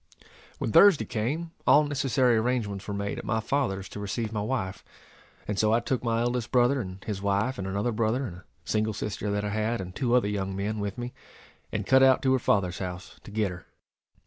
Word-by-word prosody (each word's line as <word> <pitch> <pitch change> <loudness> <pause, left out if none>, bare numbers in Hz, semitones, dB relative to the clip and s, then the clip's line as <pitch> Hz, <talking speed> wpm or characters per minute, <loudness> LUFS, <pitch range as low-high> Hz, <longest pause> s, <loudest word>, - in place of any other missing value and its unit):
When - - -2
Thursday 200 - +7
came, 140 +9 -2 0.2
all 150 - +7
necessary 135 -4 +2
arrangements 110 -4 -1
were 100 - -3
made 100 0 -3
at - - -7
my 110 - 0
father's 110 -6 -1
to - - -8
receive 105 +2 -3
my 105 - -1
wife; 95 -5 -3 0.6
and 105 -1 -2
so 110 0 +3
I 115 - +4
took 125 +1 -2
my 115 -1 +1
eldest 120 0 -1
brother 125 +2 +3
and 95 -2 -8
his 100 -3 -4
wife, 100 +5 0
and 95 - -3
another 100 +5 -1
brother, 115 +4 0
and 90 -6 -7
a 90 - -16 0.2
single 110 0 0
sister 105 0 -3
that 105 0 -1
I - - -1
had, 110 +3 -1
and 90 -1 -6
two 125 -3 +1
other 125 -5 +3
young 95 -2 -2
men 105 +2 -2
with 100 -1 -3
me, 120 0 -5 0.6
and - - -2
cut 130 0 +5
out 130 -1 +5
to 130 -1 +3
her 130 - +3
father's 95 -6 +1
house 90 0 -6
to - - -9
get 105 -2 0
her. 90 - -10
110 Hz, 220 wpm, -27 LUFS, 100-125 Hz, 0.6 s, Thursday